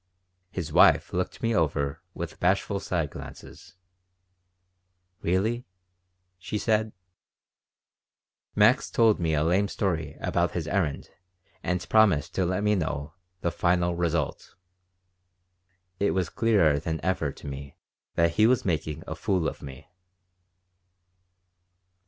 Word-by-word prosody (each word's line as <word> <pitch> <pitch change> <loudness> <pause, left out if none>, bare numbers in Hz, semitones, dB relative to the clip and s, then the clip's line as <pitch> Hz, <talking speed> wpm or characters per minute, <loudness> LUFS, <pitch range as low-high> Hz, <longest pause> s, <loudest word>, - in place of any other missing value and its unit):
His 85 -5 -5
wife - - +5
looked - - -3
me 115 0 +2
over 70 -6 0
with - - -6
bashful 100 +2 +1
side 85 -6 -2
glances. - - -11 1.5
"Really?" 110 +8 0 0.7
she 105 - -4
said. 110 0 0 1.6
Max 105 +4 +4
told 115 -2 +3
me 80 -2 +1
a 75 - +1
lame 90 +5 +2
story 85 -7 -2
about 85 0 0
his 85 -3 -3
errand 80 -5 -1 0.5
and 90 +1 -2
promised 90 -8 +3
to 95 -2 0
let 95 +3 -1
me 105 0 +3
know 80 -5 -2 0.3
the 85 - 0
"final 85 0 +1
result." 85 -3 -2 1.4
It 100 - +1
was 90 -3 0
clearer 95 -11 +3
than 80 +1 -3
ever 90 -6 0
to - - -14
me 70 0 -8 0.4
that 85 0 +3
he 110 +5 +4
was 125 +1 +2
making 80 -4 -2
a - - -5
fool 90 -4 0
of - - -5
me. 65 -2 -10
90 Hz, 120 wpm, -27 LUFS, 80-100 Hz, 1.6 s, wife